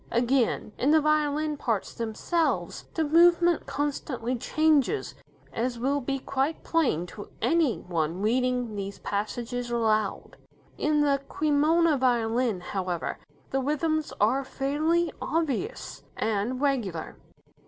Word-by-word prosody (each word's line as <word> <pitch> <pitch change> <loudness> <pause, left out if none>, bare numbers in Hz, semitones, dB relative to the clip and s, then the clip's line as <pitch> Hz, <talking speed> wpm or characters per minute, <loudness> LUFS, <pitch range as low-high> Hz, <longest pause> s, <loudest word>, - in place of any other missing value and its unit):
Again, 240 -2 +1
in 265 - +2
the 315 +1 +6
violin 305 0 +1
parts 225 -7 -2
themselves, 235 +9 -1
the 320 - +1
movement 340 +2 +4
constantly 275 -3 -2
changes, 310 - +1 0.4
as 240 +1 -1
will 275 +4 0
be 275 +2 -2
quite 275 +3 -2
plain 275 - +1
to 205 +3 -10
any 325 -8 +2
one 170 0 -2
reading 250 0 +1
these 200 0 -5
passages 240 +4 -3
aloud. 220 -3 0 0.4
In 300 0 +1
"The 280 -1 +2
Cremona 305 +1 +3
Violin", 235 -4 +1
however, 180 -2 -3 0.3
the 270 - +1
rhythms 310 +2 0
are 255 +7 +3
fairly 310 +5 0
obvious 325 - -2 0.2
and 220 +4 -1
regular. 240 - -1
270 Hz, 115 wpm, -27 LUFS, 225-305 Hz, 0.4 s, the